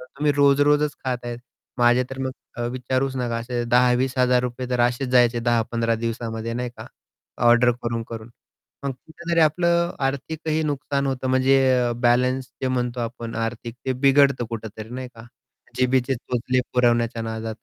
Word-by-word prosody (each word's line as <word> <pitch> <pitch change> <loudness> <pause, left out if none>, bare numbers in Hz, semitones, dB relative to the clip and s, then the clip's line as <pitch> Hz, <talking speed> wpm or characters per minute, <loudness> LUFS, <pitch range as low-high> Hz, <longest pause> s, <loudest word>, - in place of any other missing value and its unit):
तर 125 - -10
तुम्ही 145 +3 -1
रोज 140 0 +4
रोजच 150 0 +3
खात 125 -2 -1
आहेत, 120 0 -5 0.4
माझे 120 +1 +4
तर 135 - -7
मग 130 0 -2 0.4
विचारूच 130 +1 -1
नका 120 -2 -1
असे 120 +1 -3
₹10,000-₹20,000 125 0 +2
तर 125 - +1
असेच 125 +2 +1
जायचे 120 -1 +4
10-15 115 0 +1
दिवसामध्ये 115 -1 -3
नाही 125 0 -3
का, - - -9 0.6
ऑर्डर 120 +1 +6
करून-करून. 115 -1 -5 0.5
मग 140 - 0
कुठेतरी 165 +5 -3
आपलं 170 +2 +2
आर्थिकही 155 +3 -2
नुकसान 140 -1 -1
होतं 130 -1 -2
म्हणजे 130 +1 +4 0.3
अ, - - -1
बॅलन्स 125 +2 +1 0.2
जे 130 - +1
म्हणतो 125 -1 -1
आपण 115 0 -5
आर्थिक 115 +1 -4
ते 130 - +2
बिघडतं 135 -2 +4
कुठेतरी 110 -1 -7
नाही 130 0 -5
का. 115 +1 -12 0.5
जिभेचे 130 +1 +2
चोचले 125 +1 -1
पुरवण्याच्या 120 -2 +2
नादात. 110 0 -4
125 Hz, 150 wpm, -23 LUFS, 120-135 Hz, 0.6 s, ऑर्डर